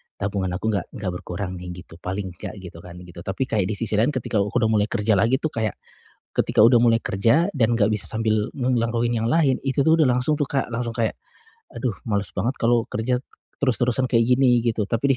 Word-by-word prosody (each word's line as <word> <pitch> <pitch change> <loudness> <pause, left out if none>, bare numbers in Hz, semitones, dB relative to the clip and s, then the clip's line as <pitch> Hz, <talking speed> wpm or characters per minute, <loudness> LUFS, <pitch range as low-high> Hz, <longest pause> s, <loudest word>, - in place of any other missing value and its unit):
tabungan 100 -1 -2
aku 110 +4 -1
enggak 100 -3 -2
enggak 95 -4 -3
berkurang 90 +1 -5
nih," 90 - -8 0.2
gitu. 85 0 -16
Paling 95 0 -4
nggak - - -6
gitu, 85 -2 -10
kan 85 +1 -11
gitu. 85 -1 -12
Tapi 95 +8 -3
kayak 105 -7 0
di 110 - -2
sisi 105 0 -1
lain 135 +6 +2
ketika 110 -4 -1
aku 100 0 -2
udah 110 0 +2
mulai 105 -1 +2
kerja 110 -1 -1
lagi 115 +5 +3
tuh 155 - 0
kayak 110 -3 -2 0.6
ketika - - +2
udah 120 +2 +7
mulai 115 -1 +3
kerja 115 - +2
dan 120 - +1
enggak 110 -2 +2
bisa 105 -2 -1
sambil 110 -1 0
nge 130 -2 -2
ngelakuin 115 +1 0
yang 115 - -1
lain, 135 0 +2
itu 135 +1 +2
tuh 160 +3 +4
udah 155 - +5
langsung 125 +4 +1
tuh 145 - 0
Kak, 135 -2 -2
langsung 115 0 -3
kayak, 115 -2 -1 0.5
"Aduh, 120 -7 -3
males 100 -3 -1
banget 120 +8 -1
kalau 115 0 +3
kerja 115 +4 0 0.4
terus-terusan 125 -1 +1
kayak 115 -2 +3
gini," 125 -3 +4
gitu. 115 -2 0
Tapi 125 +6 +1
115 Hz, 220 wpm, -23 LUFS, 105-125 Hz, 0.6 s, udah